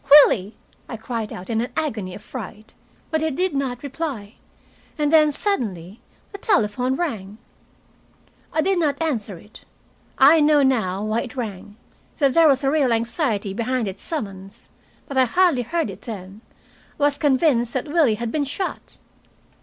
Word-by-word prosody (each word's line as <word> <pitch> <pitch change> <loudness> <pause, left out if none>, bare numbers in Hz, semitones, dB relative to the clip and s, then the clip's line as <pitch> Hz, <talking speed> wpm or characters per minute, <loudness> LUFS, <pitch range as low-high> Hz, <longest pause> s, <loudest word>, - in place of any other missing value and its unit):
"Willie!" 230 -8 +7 0.3
I 230 - -5
cried 225 -1 -4
out, 180 - -8
in 225 -1 0
an 245 - -4
agony 215 - -2
of 205 - -11
fright. 220 -3 -9 0.4
But 315 -1 +1
he 320 - +1
did 360 +5 -1
not 265 -3 -2
reply. 270 -7 -5 0.6
And 300 0 0
then, 305 -2 +6
suddenly, 215 - -3 0.3
the 400 - -9
telephone 255 - +1
rang. 215 - -4 1.1
I 315 - +1
did 380 +2 +1
not 290 -4 0
answer 230 - -2
it. 210 +6 -16 0.5
I 290 +5 +7
know 295 -1 +4
now 210 -8 +1
why 215 +2 0
it 250 - -8
rang, 205 -4 -6 0.4
that 275 -4 +2
there 330 -1 +6
was 275 -2 +3
real 275 -2 +2
anxiety 230 - -1
behind 235 +1 -1
its 195 0 -6
summons. 195 - -7 0.4
But 275 - -5
I 260 - +5
hardly 340 0 +3
heard 325 +7 -2
it - - -12
then. 200 -3 -8 0.6
I - - 0
was 290 0 +2
convinced 265 -4 +2
that 260 - -2
Willie 295 -7 +3
had 230 +1 -4
been 295 +1 0
shot. 370 +8 -5
255 Hz, 160 wpm, -22 LUFS, 215-300 Hz, 1.1 s, Willie